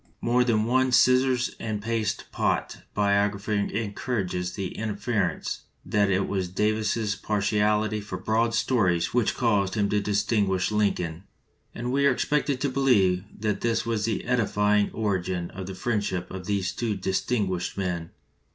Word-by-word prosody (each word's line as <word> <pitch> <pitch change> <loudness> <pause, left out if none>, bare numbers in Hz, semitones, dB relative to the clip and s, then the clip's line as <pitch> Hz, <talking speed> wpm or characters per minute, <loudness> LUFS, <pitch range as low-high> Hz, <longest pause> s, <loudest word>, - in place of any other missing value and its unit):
More 125 +1 +2
than 115 -3 +2
one 130 +2 +2
scissors 125 0 +3
and 110 -2 -3
paste 110 -1 -2
pot - - -1 0.2
biographer 100 0 +1
encourages 100 -3 -2
the 95 -3 -3
inference 105 -2 -2 0.2
that 100 -1 +2
it 95 0 +1
was 95 -2 -1
Davis's 105 +2 0
partiality 105 +1 +1
for 100 -2 -6
broad 115 +3 +1
stories 95 -9 +1
which 120 -3 +2
caused 105 -6 +1
him 100 -2 +1
to 105 0 +1
distinguish 100 -2 +1
Lincoln, 95 -5 0 0.5
and 120 +1 -3
we 140 +1 +3
are - - +5
expected 140 +1 0
to 140 - +1
believe 105 -9 +3 0.2
that 105 -2 -1
this 115 -1 0
was 115 -3 0
the 115 - -2
edifying 105 -4 +2
origin 95 -5 -2
of 95 0 -7
the 95 - -6
friendship 95 -3 -2
of 95 -1 -7
these 100 -3 0
two 115 -3 -2
distinguished 95 -1 -1
men. 90 -4 -2
105 Hz, 145 wpm, -26 LUFS, 95-115 Hz, 0.5 s, are